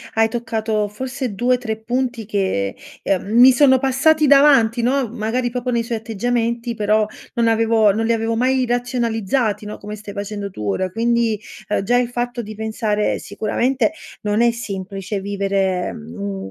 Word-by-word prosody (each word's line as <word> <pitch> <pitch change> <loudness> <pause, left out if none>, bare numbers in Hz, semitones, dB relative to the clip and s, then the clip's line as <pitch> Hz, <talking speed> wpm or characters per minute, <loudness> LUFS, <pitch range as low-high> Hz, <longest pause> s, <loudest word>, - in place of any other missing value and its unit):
hai 225 0 +4
toccato 220 -2 -2
forse 255 +2 -5
2-3 245 0 0
punti 240 0 -2
che, 190 - -1 0.3
ehm, 190 -2 0
mi 255 +2 +9
sono 260 0 +5
passati 275 +4 +3
davanti, 275 -5 +5
no? 260 +2 +1
Magari 240 +2 -2
proprio 250 +1 -3
nei 235 -1 +1
suoi 230 -1 -3
atteggiamenti, 235 +2 -1
però 215 -1 +2 0.3
non 235 -1 +2
avevo 225 -1 +3
non 225 +1 -1
li 230 - +3
avevo 225 0 -1
mai 255 +2 +2
razionalizzati, 235 -3 -1
no? 210 - -6
Come 210 +1 -7
stai 205 -1 -10
facendo 205 0 -4
tu 105 - -6
ora. 185 - 0
Quindi, 230 +1 +1 0.3
uhm, 210 - 0
già 245 +5 +2
il 245 -1 +1
fatto 245 0 -3
di 215 -1 -8
pensare 220 -1 -1
sicuramente 235 +5 0 0.3
non 210 +1 0
è 235 - +5
semplice 195 -3 -5
vivere, 195 -2 -1
mhmm, 95 +5 -6
225 Hz, 160 wpm, -20 LUFS, 205-245 Hz, 0.3 s, mi